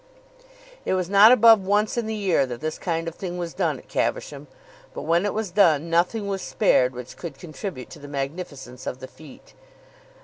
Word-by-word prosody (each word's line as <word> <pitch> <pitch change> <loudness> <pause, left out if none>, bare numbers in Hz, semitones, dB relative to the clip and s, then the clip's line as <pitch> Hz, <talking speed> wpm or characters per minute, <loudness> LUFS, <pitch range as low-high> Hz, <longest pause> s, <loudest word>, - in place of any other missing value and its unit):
It - - 0
was 185 0 -2
not 205 +3 +8
above 230 -3 +7
once 205 +2 +1
in 235 -2 -2
the 220 - -3
year 185 -10 +1
that 120 -1 -6
this 155 +2 -4
kind 165 -2 -2
of 165 - -4
thing 180 0 -6
was 170 -2 -4
done - - -1
at - - -16
Caversham; - - -3 0.5
but - - -5
when 170 +4 +2
it - - -1
was 215 -4 -3
done, 170 -5 +3
nothing 180 +5 +1
was 195 -1 -3
spared 130 - +2
which 125 0 -8
could 160 -6 -8
contribute 165 - -7
to 160 - -11
the 145 - -10
magnificence 140 -2 -6
of - - -3
the 130 - -8
fête. 150 -1 -16
175 Hz, 200 wpm, -24 LUFS, 145-200 Hz, 0.5 s, not